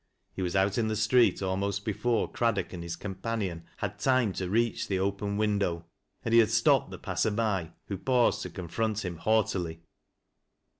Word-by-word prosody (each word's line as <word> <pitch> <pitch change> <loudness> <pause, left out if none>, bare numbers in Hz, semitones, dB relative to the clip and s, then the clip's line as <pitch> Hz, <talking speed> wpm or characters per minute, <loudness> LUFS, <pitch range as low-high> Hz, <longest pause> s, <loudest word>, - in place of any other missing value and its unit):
He - - -5
was 90 0 -2
out 95 +3 +2
in 110 - +1
the 110 - -1
street 110 0 +3
almost 100 +1 -1
before 115 +2 0
Craddock 115 -7 0
and 90 - -6
his 85 0 -4
companion 95 -4 -4
had 105 0 -4
time 130 -3 +2
to 95 -1 -3
reach 115 +2 +1
the 95 - 0
open 100 +1 -1
window, 100 -6 0 0.4
and 115 - 0
he 115 - +8
had 110 -2 +5
stopped 115 +1 +3
the - - -7
passer - - -1
by, 105 -6 -1
who 100 -2 -5
paused 125 0 +2
to - - -4
confront 105 +4 -2
him 85 -2 -4
haughtily. 90 -4 0
100 Hz, 180 wpm, -29 LUFS, 95-110 Hz, 0.4 s, he